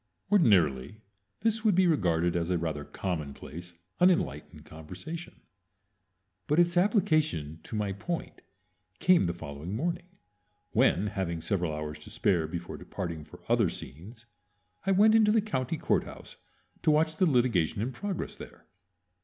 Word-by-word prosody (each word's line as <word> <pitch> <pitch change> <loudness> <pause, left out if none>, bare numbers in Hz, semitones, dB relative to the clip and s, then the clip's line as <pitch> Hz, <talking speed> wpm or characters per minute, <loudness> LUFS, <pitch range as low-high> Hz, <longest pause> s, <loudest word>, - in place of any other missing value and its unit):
Ordinarily 100 - +3 0.4
this 225 0 +1
would 210 -5 +4
be 185 +1 +5
regarded 90 - +2
as 85 0 -1
a 90 - +2
rather 80 -3 -3
commonplace, 85 +1 -6 0.3
unenlightened 175 - +1
conversation; 90 - -9 1.1
but 150 - +1
its 175 0 +4
application 155 - +1
to - - -8
my 105 -2 -1
point 165 - -5 0.6
came 180 - +4
the 85 - -1
following 80 +3 -6
morning, 170 +7 -2 0.6
when, 95 - +3
having 95 -5 -2
several 85 0 -1
hours 75 0 -5
to - - -10
spare 85 -5 +1
before 85 +1 -6
departing 85 -3 -5
for 75 - -15
other - - +3
scenes, 100 - -8 0.6
I - - +4
went 210 +3 +6
into 220 -1 +5
the 220 - +4
county 165 - -2
courthouse - - -2 0.5
to 160 - +2
watch 155 +1 +2
the 185 - +4
litigation 120 - +2
in 120 +5 -1
progress 195 +7 -4
there. - - -12
105 Hz, 140 wpm, -29 LUFS, -, 1.1 s, went